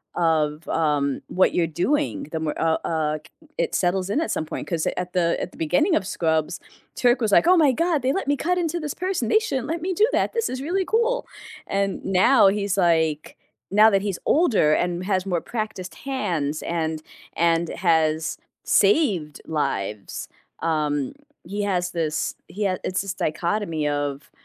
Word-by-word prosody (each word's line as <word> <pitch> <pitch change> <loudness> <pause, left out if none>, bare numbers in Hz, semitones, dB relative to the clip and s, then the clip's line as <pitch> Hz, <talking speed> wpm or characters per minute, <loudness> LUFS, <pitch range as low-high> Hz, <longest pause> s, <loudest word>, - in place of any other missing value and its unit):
of, 155 -2 +1
um, 145 -4 0
what 185 - +2
you're 170 -2 +2
doing, 290 - 0
the 160 - -2
more 155 -1 -3
uh 160 0 +2
uh, 155 -2 -1
k - - -18 0.3
it - - 0
settles 185 +1 0
in 275 - +1
at - - -2
some - - -1
point, - - -5
'cause 165 -3 -1
at 180 0 -4
the 170 -2 +2
at - - -4
the - - -17
beginning 240 - +2
of 195 - 0
Scrubs, 160 -4 0 0.4
Turk 245 0 +3
was 215 -2 +1
like, 330 - +5
"Oh 365 - +7
my 300 -5 +5
god, 330 +2 +1
they 255 +1 +1
let 385 - -2
me 285 - +3
cut 360 +3 0
into 345 -1 -1
this 300 -3 -4
person, 365 -10 -2
they - - +5
shouldn't 270 - -3
let 325 +1 -3
me 370 +1 -1
do 425 +5 +4
that. - - +1
This 460 -1 0
is 255 +1 -4
really 370 +6 0
cool," 470 +4 +1 0.4
and 195 0 -1
now, 195 +5 +5
he's 200 0 +1
like 195 - +3
now - - +4
he's 160 -1 +4
like 155 - -17 0.3
now 215 +2 +7
that 195 -1 +2
he's 200 -4 -2
older 230 - +3
and 175 +2 -1
has 190 -2 0
more 175 -3 0
practiced 215 -5 -5
hands 170 - -2
and 160 -2 -2 0.3
and 170 0 +2
has 160 -2 +1 0.3
saved 195 - +2
lives, 105 -10 -3 0.3
um, 150 -4 0 0.3
he 200 +4 -4
has 180 -3 0
this 160 -3 -2
he 210 +3 -4
had 185 -2 0
it's 185 - -1
this 195 -1 -4
dichotomy 170 -2 -1
of, 145 -1 -3
185 Hz, 190 wpm, -23 LUFS, 160-255 Hz, 0.4 s, Oh